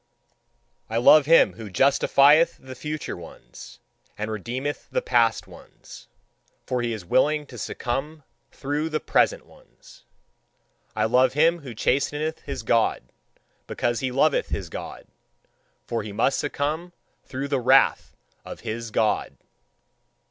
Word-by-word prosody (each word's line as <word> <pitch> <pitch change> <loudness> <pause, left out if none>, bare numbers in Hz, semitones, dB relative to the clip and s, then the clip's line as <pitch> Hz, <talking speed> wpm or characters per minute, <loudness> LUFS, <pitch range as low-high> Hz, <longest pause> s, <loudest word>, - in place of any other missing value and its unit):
I 115 - -2
love 140 +4 +6
him 165 +1 +5
who 110 -2 -9
justifieth 140 - +4
the 130 0 -10
future 150 +3 -5
ones, 80 -8 -13 0.4
and 105 +1 -4
redeemeth 125 +7 -4
the - - -2
past 115 -2 +2
ones: - - -15 0.6
for 125 -1 -2
he 120 -1 -2
is 110 -6 -6
willing 150 - +2
to 130 -3 -12
succumb 140 +8 -4 0.3
through 145 +3 -3
the 155 -1 -1
present - - +1
ones. - - -20 0.9
I - - +1
love 130 +1 +3
him 165 +4 +3
who 130 -6 -10
chasteneth 145 +7 -1
his 140 -5 -7
God, 115 - +1 0.6
because 120 -1 -1
he 130 -1 -2
loveth 140 +4 +1
his 90 -4 -4
God: - - -8 0.8
for 115 - -3
he 105 0 -7
must 135 +6 +1
succumb 155 +4 -3 0.3
through 135 +2 -5
the 140 -2 0
wrath 130 +2 +3 0.3
of - - -10
his 115 +1 -5
God. 110 0 -1
135 Hz, 135 wpm, -24 LUFS, 115-150 Hz, 0.9 s, love